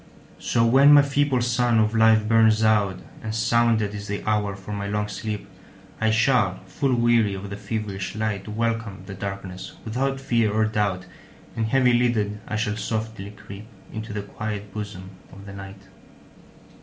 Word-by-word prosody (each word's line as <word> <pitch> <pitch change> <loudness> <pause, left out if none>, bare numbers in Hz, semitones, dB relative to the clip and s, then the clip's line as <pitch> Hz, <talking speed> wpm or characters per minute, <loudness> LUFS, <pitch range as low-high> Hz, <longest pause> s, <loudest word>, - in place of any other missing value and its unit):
So 115 -1 +1
when 135 +5 +7
my 145 -1 +8
feeble 140 -2 +1
sun 120 -1 +2
of 110 0 +2
life 110 -1 +4
burns 110 -1 +4
out, 105 -3 +2 0.2
And 110 0 -4
sounded 115 -2 +2
is 105 0 -6
the 100 0 -4
hour 105 -2 0
for 100 +2 -8
my 100 0 -3
long 105 0 -1
sleep,I 100 0 -6
shall, 110 -3 +2
full 135 -3 0
weary 120 -4 +3
of 100 +1 -7
the - - -4
feverish 100 -2 -4
light, 110 -2 -2
Welcome 115 -2 -2
the 100 - -8
darkness 95 -1 -6
without 135 +4 -1
fear 115 -5 +1
or 110 +1 +2
doubt, 105 -4 -1 0.5
And 110 -1 -1
heavy 125 0 +3
lidded, 115 -4 +1
I 110 - -3
shall 105 -1 -1
softly 110 -1 -4
creepInto 105 +1 -10
the 105 -1 -4
quiet 105 -1 -6
bosom 100 -3 -7 0.2
of 100 +1 -12
the 100 - -9
Night. 95 0 -10
110 Hz, 160 wpm, -24 LUFS, 100-115 Hz, 0.5 s, my